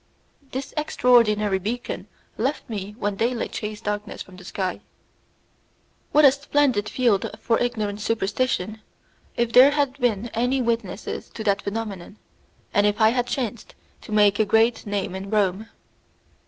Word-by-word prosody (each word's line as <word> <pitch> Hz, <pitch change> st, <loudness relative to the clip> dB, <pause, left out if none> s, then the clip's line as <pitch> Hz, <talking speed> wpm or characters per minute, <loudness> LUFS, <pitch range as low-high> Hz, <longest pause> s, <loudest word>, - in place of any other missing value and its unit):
This 265 Hz, +1 st, -5 dB
extraordinary 215 Hz, -9 st, +3 dB
beacon 235 Hz, +6 st, -4 dB, 0.3 s
left 265 Hz, +6 st, -2 dB
me 210 Hz, -2 st, -5 dB
when 205 Hz, -4 st, -2 dB
daylight 235 Hz, +2 st, -1 dB
chased 210 Hz, 0 st, -5 dB
darkness 210 Hz, 0 st, -4 dB
from 185 Hz, -, -16 dB
the 180 Hz, -, -13 dB
sky. 185 Hz, 0 st, -3 dB, 1.3 s
What 300 Hz, 0 st, +6 dB
a 275 Hz, -, +9 dB
splendid 275 Hz, -6 st, +1 dB
field 230 Hz, -6 st, +1 dB
for 230 Hz, -, +1 dB
ignorant 215 Hz, -4 st, -2 dB
superstition, 215 Hz, -1 st, -1 dB, 0.6 s
if 235 Hz, -1 st, 0 dB
there 255 Hz, +3 st, +9 dB
had 285 Hz, -2 st, 0 dB
been 235 Hz, -2 st, 0 dB
any 245 Hz, +4 st, 0 dB
witnesses 230 Hz, -5 st, -3 dB
to 220 Hz, -, -5 dB
that 200 Hz, -1 st, +1 dB
phenomenon, 200 Hz, -2 st, -5 dB, 0.6 s
and 205 Hz, 0 st, +4 dB
if 205 Hz, 0 st, 0 dB
I 220 Hz, 0 st, +6 dB
had 245 Hz, +1 st, 0 dB
chanced 240 Hz, -3 st, -4 dB, 0.3 s
to -, -, -11 dB
make 205 Hz, -1 st, +4 dB
a -, -, +5 dB
great 225 Hz, +2 st, +2 dB
name 200 Hz, -2 st, -2 dB
in 190 Hz, +1 st, -6 dB
Rome! 205 Hz, 0 st, 0 dB
220 Hz, 145 wpm, -24 LUFS, 205-245 Hz, 1.3 s, a